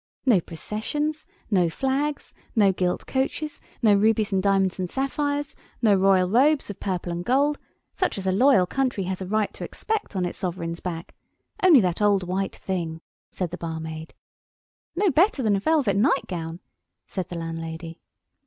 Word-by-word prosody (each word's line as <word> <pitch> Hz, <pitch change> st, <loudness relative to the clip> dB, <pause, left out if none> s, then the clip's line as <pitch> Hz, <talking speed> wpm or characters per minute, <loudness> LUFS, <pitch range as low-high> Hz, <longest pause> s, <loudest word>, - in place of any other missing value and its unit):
"No 225 Hz, -9 st, +5 dB
processions, 260 Hz, -, -3 dB, 0.2 s
no 180 Hz, -4 st, +3 dB
flags, 275 Hz, -, -2 dB, 0.2 s
no 205 Hz, -4 st, +5 dB
gilt 180 Hz, -1 st, -1 dB
coaches, 280 Hz, +3 st, -2 dB, 0.2 s
no 215 Hz, -2 st, +6 dB
rubies 215 Hz, 0 st, +2 dB
and 190 Hz, -, +2 dB
diamonds 195 Hz, -1 st, +2 dB
and 180 Hz, -1 st, -2 dB
sapphires, 285 Hz, -, -2 dB, 0.2 s
no 220 Hz, -4 st, +4 dB
royal 190 Hz, -1 st, +4 dB
robes 265 Hz, +5 st, +3 dB
of 200 Hz, -, -11 dB
purple 180 Hz, -3 st, -3 dB
and 170 Hz, +1 st, -3 dB
gold—such 285 Hz, -, -1 dB
as 195 Hz, -, -4 dB
a 190 Hz, -, +2 dB
loyal 210 Hz, -1 st, +5 dB
country 255 Hz, -2 st, -1 dB
has 185 Hz, +1 st, -3 dB
a 190 Hz, -, -4 dB
right 215 Hz, +1 st, 0 dB
to -, -, -8 dB
expect 435 Hz, -, -3 dB
on 185 Hz, -1 st, 0 dB
its 175 Hz, -, -5 dB
sovereign's 170 Hz, -2 st, -3 dB
back! 170 Hz, -2 st, -6 dB, 0.5 s
Only 340 Hz, -9 st, +7 dB
that 180 Hz, 0 st, -1 dB
old 200 Hz, -2 st, +3 dB
white 190 Hz, +2 st, -2 dB
thing," 165 Hz, -4 st, -4 dB, 0.3 s
said 180 Hz, -3 st, -3 dB
the 175 Hz, -, -6 dB
barmaid. 160 Hz, -1 st, -6 dB, 0.8 s
"No 385 Hz, 0 st, +3 dB
better 310 Hz, -2 st, +3 dB
than 210 Hz, -2 st, +3 dB
a -, -, +1 dB
velvet 275 Hz, -5 st, +2 dB
nightgown," 180 Hz, -, 0 dB, 0.4 s
said 185 Hz, -2 st, -4 dB
the 175 Hz, -, -5 dB
landlady. 165 Hz, 0 st, -6 dB
195 Hz, 160 wpm, -25 LUFS, 180-265 Hz, 0.8 s, Only